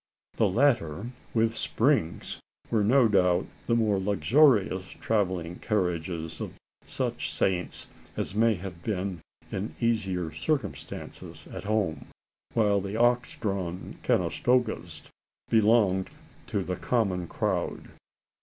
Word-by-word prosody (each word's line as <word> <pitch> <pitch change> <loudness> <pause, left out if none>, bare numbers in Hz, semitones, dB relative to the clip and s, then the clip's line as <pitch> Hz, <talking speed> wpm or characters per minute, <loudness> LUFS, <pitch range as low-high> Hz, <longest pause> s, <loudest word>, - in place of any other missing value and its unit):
The 110 - +4
latter, 115 - +1 0.2
with 115 0 +3
springs, 115 - 0 0.3
were 110 -3 +3
no 125 +3 +5
doubt 90 -3 +3 0.2
the 115 - +3
more 110 -4 +2
luxurious 100 - +3
travelling 95 -6 -1
carriages 85 -5 -2
of - - -4 0.3
such - - -2
Saints 90 -2 -1 0.3
as - - -2
may 110 +1 +3
have 90 -2 -8
been 95 -5 -2 0.3
in 75 - -4
easier 95 -8 0
circumstances 130 - -4
at - - -6
home; 105 -6 0 0.5
while 105 -3 +3
the 100 +2 -4
ox 120 +2 +2
drawn 95 -5 -3
"Conestogas" 110 -10 +1 0.5
belonged 105 -4 +4 0.4
to 100 - -1
the 90 0 -3
common 95 -8 0
crowd. - - -2
100 Hz, 110 wpm, -28 LUFS, 90-115 Hz, 0.5 s, no